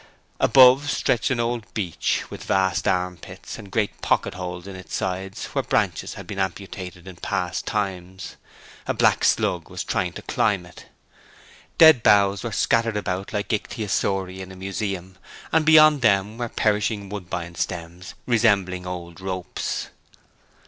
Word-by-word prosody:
Above 130 Hz, +2 st, +6 dB
stretched 120 Hz, -5 st, +1 dB
an 130 Hz, -2 st, 0 dB
old 115 Hz, -4 st, -2 dB
beech, 95 Hz, -7 st, -1 dB
with -, -, -8 dB
vast 95 Hz, -2 st, +1 dB
armpits, 90 Hz, +3 st, -3 dB
and 100 Hz, -3 st, -10 dB
great 105 Hz, -1 st, -1 dB
pocket -, -, +1 dB
holes 90 Hz, 0 st, -6 dB
in 100 Hz, -1 st, -8 dB
its 95 Hz, -3 st, -7 dB
sides 95 Hz, +1 st, -3 dB
where -, -, +1 dB
branches -, -, -1 dB
had -, -, -9 dB
been 100 Hz, -, -6 dB
amputated 95 Hz, -1 st, -5 dB
in 95 Hz, -, -9 dB
past 90 Hz, +1 st, -3 dB
times; 95 Hz, -3 st, -4 dB, 0.5 s
a -, -, 0 dB
black -, -, +3 dB
slug -, -, +1 dB
was -, -, -5 dB
trying -, -, -1 dB
to -, -, -9 dB
climb 100 Hz, -5 st, 0 dB
it. 90 Hz, -, -14 dB, 0.9 s
Dead 160 Hz, -6 st, +8 dB
boughs 100 Hz, -2 st, +4 dB
were 115 Hz, -, -3 dB
scattered 115 Hz, +1 st, +1 dB
about 95 Hz, -1 st, -3 dB
like 105 Hz, +1 st, -2 dB
ichthyosauri 100 Hz, -4 st, -2 dB
in 95 Hz, 0 st, -8 dB
a -, -, -10 dB
museum, 95 Hz, -1 st, -5 dB, 0.3 s
and 160 Hz, -1 st, +3 dB
beyond 155 Hz, -2 st, +7 dB
them 105 Hz, 0 st, +2 dB
were 120 Hz, -1 st, -2 dB
perishing 105 Hz, -1 st, 0 dB
woodbine 90 Hz, -3 st, -5 dB
stems 85 Hz, +1 st, -5 dB
resembling 100 Hz, -6 st, +2 dB
old 85 Hz, -1 st, -7 dB
ropes. 95 Hz, -2 st, -4 dB
95 Hz, 150 wpm, -23 LUFS, 90-110 Hz, 0.9 s, Dead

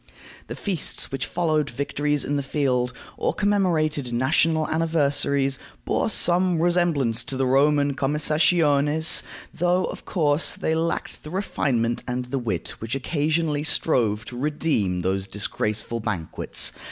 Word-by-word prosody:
The -, -, -6 dB
feasts 190 Hz, -6 st, -1 dB
which 135 Hz, 0 st, -2 dB
followed 155 Hz, -4 st, 0 dB
victories 145 Hz, +1 st, -1 dB
in 145 Hz, -, -1 dB
the 140 Hz, -, 0 dB
field, 130 Hz, -3 st, 0 dB, 0.3 s
or -, -, -1 dB
commemorated 160 Hz, -10 st, +1 dB
national 155 Hz, +6 st, +2 dB
anniversaries, 140 Hz, -4 st, +1 dB, 0.3 s
bore -, -, 0 dB
some 180 Hz, -1 st, +2 dB
resemblance 165 Hz, -9 st, +2 dB
to 135 Hz, -, -4 dB
the 135 Hz, -, +1 dB
Roman 140 Hz, +2 st, +3 dB
commessationes, 150 Hz, +1 st, +3 dB, 0.3 s
though, 180 Hz, +2 st, +1 dB
of -, -, -7 dB
course, 150 Hz, -2 st, 0 dB
they 160 Hz, -, -1 dB
lacked 165 Hz, +1 st, -2 dB
the 150 Hz, -, -9 dB
refinement 130 Hz, -, -1 dB
and 125 Hz, 0 st, -2 dB
the 130 Hz, +2 st, -3 dB
wit 110 Hz, -9 st, -3 dB
which 115 Hz, +3 st, -3 dB
occasionally 150 Hz, +2 st, 0 dB
strove 115 Hz, -8 st, +1 dB
to 125 Hz, -, -8 dB
redeem 135 Hz, -, 0 dB
those 95 Hz, +1 st, -1 dB
disgraceful 105 Hz, +3 st, -3 dB
banquets. 105 Hz, -7 st, -1 dB
145 Hz, 130 wpm, -24 LUFS, 125-160 Hz, 0.3 s, Roman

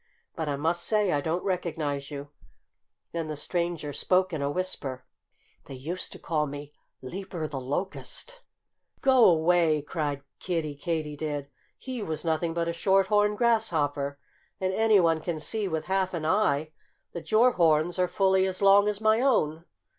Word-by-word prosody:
But 160 Hz, -2 st, -3 dB
I 140 Hz, -, 0 dB
must 165 Hz, +4 st, 0 dB
say 210 Hz, -3 st, +2 dB
I 145 Hz, -, +1 dB
don't 165 Hz, +4 st, -2 dB
recognize 155 Hz, -7 st, -2 dB
you." 145 Hz, -1 st, -7 dB, 0.8 s
Then 165 Hz, -2 st, -3 dB
the 155 Hz, -, -4 dB
stranger 170 Hz, -1 st, -3 dB
spoke 185 Hz, +3 st, +1 dB
in 155 Hz, -, -2 dB
a 140 Hz, -, 0 dB
whisper: 145 Hz, -7 st, -4 dB, 0.6 s
"They 135 Hz, -, -9 dB
used 165 Hz, +8 st, -5 dB
to -, -, -9 dB
call 155 Hz, -2 st, -1 dB
me 145 Hz, +1 st, -8 dB, 0.3 s
'Leaper 175 Hz, +2 st, -5 dB
the 140 Hz, -3 st, -5 dB
Locust'!" 190 Hz, -, -5 dB, 0.6 s
"Go 260 Hz, -7 st, +6 dB
'way!" 160 Hz, -2 st, +3 dB
cried 145 Hz, -2 st, -3 dB, 0.2 s
Kiddie 165 Hz, -5 st, -2 dB
Katydid. 150 Hz, -2 st, -3 dB, 0.3 s
"He 255 Hz, -3 st, -6 dB
was 160 Hz, -4 st, -4 dB
nothing 165 Hz, +1 st, 0 dB
but 170 Hz, 0 st, 0 dB
a 170 Hz, -, -1 dB
Short 190 Hz, +2 st, +2 dB
horned 210 Hz, 0 st, +3 dB
Grasshopper. 155 Hz, -, +1 dB, 0.4 s
And 190 Hz, 0 st, -1 dB
anyone 190 Hz, -7 st, +4 dB
can 165 Hz, -1 st, -3 dB
see 210 Hz, +6 st, -1 dB
with 160 Hz, -3 st, -3 dB
half 190 Hz, -1 st, 0 dB
an 160 Hz, -2 st, -3 dB
eye 155 Hz, -5 st, +1 dB, 0.4 s
that 170 Hz, -, -8 dB
your 235 Hz, +4 st, +6 dB
horns 170 Hz, -1 st, +2 dB
are 180 Hz, -, +3 dB
fully 190 Hz, 0 st, +2 dB
as 185 Hz, -1 st, -4 dB
long 200 Hz, +1 st, +6 dB
as 210 Hz, 0 st, -2 dB
my 220 Hz, +1 st, +4 dB
own." 165 Hz, -, +1 dB
170 Hz, 160 wpm, -27 LUFS, 150-190 Hz, 0.8 s, Go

